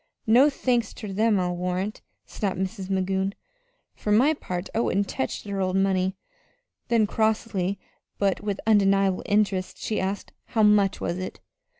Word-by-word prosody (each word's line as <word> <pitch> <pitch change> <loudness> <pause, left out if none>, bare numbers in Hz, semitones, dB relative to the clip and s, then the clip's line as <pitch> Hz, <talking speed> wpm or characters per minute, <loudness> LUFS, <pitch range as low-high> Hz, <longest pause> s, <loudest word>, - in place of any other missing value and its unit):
"No 250 +6 +6
thanks 245 -5 0
ter 210 - -7
them, 210 +1 +2
I'll 180 -1 -1
warrant," 180 +4 -3 0.2
snapped 195 -4 -3
Mrs. 190 +1 -4
Magoon. 190 +1 0 0.6
"For 210 - -3
my 255 +9 +5
part, 180 - -5
I - - 0
wouldn't 200 -3 +1
tech 130 - -2
their 200 -1 -3
old 185 0 0
money." 190 0 +1 0.7
Then, 230 -2 +3
crossly, 210 -3 0 0.4
but 195 -2 +1
with 205 -1 -3
undeniable 195 -3 +3
interest, 200 -3 +1
she 215 - -2
asked: 195 +1 -3
"How 220 -3 +1
much 205 -2 +4
was 175 - -2
it?" 185 - -6
200 Hz, 155 wpm, -25 LUFS, 190-215 Hz, 0.7 s, No